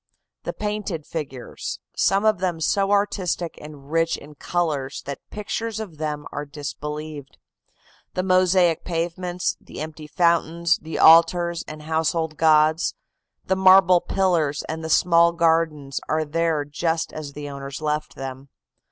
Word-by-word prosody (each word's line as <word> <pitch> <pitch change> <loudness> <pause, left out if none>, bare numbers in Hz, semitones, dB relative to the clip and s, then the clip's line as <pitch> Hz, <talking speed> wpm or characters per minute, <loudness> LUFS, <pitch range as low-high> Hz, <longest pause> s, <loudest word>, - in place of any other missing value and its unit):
The - - -3
painted 210 -7 -3
figures, 135 -6 -6 0.2
some 195 +2 +2
of 215 -3 +3
them 180 -3 -1
so 195 +5 +1
artistic 200 -4 0
and 150 -1 -12
rich 165 0 +1
in 150 +1 -13
colors 150 -4 -2
that 140 0 -6
pictures 220 +1 -4
of 180 -9 -8
them 150 -1 -3
are 145 - -4
disbelieved, 150 0 -7 0.8
the 185 - 0
mosaic 185 -2 +3
pavements, 175 +1 -2
the - - -11
empty 155 0 -7
fountains, 170 0 +2
the 160 0 -5
altars 170 +1 +5
and 155 0 -8
household 160 0 -1
gods, 155 +1 +3 0.5
the 190 - +1
marble 185 -1 +6
pillars 170 -7 0
and 160 +1 -5
the 160 - -4
small 170 0 +4
gardens 160 -5 +1
are 155 0 +1
there 160 -1 0
just 160 +3 -2
as 150 -2 -7
the 145 0 -7
owners 140 -1 -7
left 150 0 -2
them. 135 +1 -7
160 Hz, 140 wpm, -23 LUFS, 150-175 Hz, 0.8 s, marble